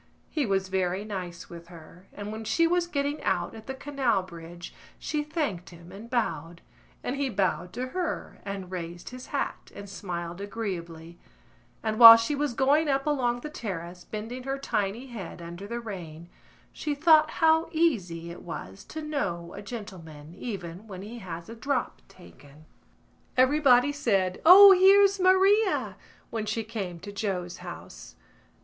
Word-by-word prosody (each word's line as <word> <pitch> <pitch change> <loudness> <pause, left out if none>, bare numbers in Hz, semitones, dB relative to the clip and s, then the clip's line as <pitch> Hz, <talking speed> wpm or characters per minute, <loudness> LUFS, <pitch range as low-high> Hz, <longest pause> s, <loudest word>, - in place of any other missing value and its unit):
He 295 -6 0
was 195 -1 0
very 190 +1 -1
nice 180 -5 -6
with 170 0 -11
her, 175 +2 -14
and 205 0 -7
when 220 +1 -6
she 335 +9 +2
was 345 +1 +1
getting 290 -2 -2
out - - -1
at 220 0 -12
the 265 - -4
Canal 265 -8 0
Bridge 170 -1 -10 0.2
she 300 -1 -2
thanked 295 - -3
him 170 0 -14
and 210 +5 -10
bowed, 170 - -2 0.4
and 260 - -3
he 280 -1 0
bowed 185 -5 -1
to 255 +1 -4
her 360 +4 -4
and 195 -2 -6
raised 175 -1 -6
his 255 0 -10
hat - - -4
and 200 0 -8
smiled 175 -2 -6
agreeably, 175 -6 -6 0.6
and 215 -1 -2
while 230 -1 +13
she 230 +5 -1
was 285 -3 -1
going 290 +4 +3
up 275 0 +1
along 245 -5 0
the 300 - -6
terrace, 180 - -6
bending 225 +4 -6
her 270 +1 -3
tiny 220 -3 -2
head 220 -10 -8
under 175 +3 -8
the 235 +2 -4
rain, 170 -7 -8 0.4
she 295 -2 -3
thought 310 0 +5
how 320 0 +3
easy 185 - 0
it 170 - -10
was 95 - -8
to 315 0 -7
know 190 - -3
a 200 - -8
gentleman 170 -9 -9
even 190 -2 -7
when 190 -2 -8
he 230 +3 -8
has 170 -4 -7
a 230 - -8
drop 255 +3 -2
taken. 150 -4 -17 0.7
Everybody 260 0 +5
said: 195 -10 0
"O, 395 +3 +11
here's 390 +1 +6
Maria!" 380 +3 +3 0.4
when 220 -2 -3
she 225 +2 -1
came 200 -6 -5
to 205 - -8
Joe's 190 -4 -3
house. - - -10
215 Hz, 160 wpm, -27 LUFS, 175-275 Hz, 0.7 s, while